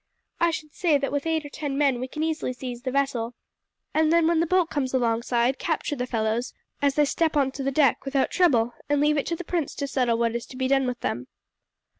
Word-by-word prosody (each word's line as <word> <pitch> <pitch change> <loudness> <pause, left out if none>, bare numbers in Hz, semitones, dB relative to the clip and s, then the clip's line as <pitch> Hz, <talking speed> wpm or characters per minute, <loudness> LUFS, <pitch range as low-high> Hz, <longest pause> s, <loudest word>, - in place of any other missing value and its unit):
I 340 - +4
should 310 -2 -5
say 330 -5 +2
that 275 0 -2
with 285 +2 -2
eight 320 -2 0
or - - -7
ten 285 -2 -4
men 275 -4 +2
we 255 - -3
can 305 +4 -4
easily 315 -5 -1
seize 250 -1 -6
the 260 - -3
vessel, 250 -3 -1 0.6
and 315 0 +3
then 335 -1 +4
when 330 0 +3
the 335 - +1
boat 365 -1 +2
comes 265 -3 -1
alongside 235 +1 +1
capture 320 -2 -1
the 250 -2 -3
fellows 225 +1 -1 0.3
as 280 -1 +2
they 295 - +4
step 320 +2 0
on 270 -2 +2
to 275 - -6
the 270 - +1
deck 275 -2 +2
without 270 -1 0
trouble, 245 -10 +3 0.2
and 290 0 +2
leave 300 +1 +3
it - - -3
to 335 - -1
the 360 - -6
prince 335 -3 -2
to 280 - -2
settle 250 -4 +1
what 230 0 0
is 235 - -4
to 255 - -11
be 260 0 0
done 270 -1 +2
with 250 -1 -4
them." 125 +1 -3
275 Hz, 245 wpm, -25 LUFS, 250-310 Hz, 0.6 s, I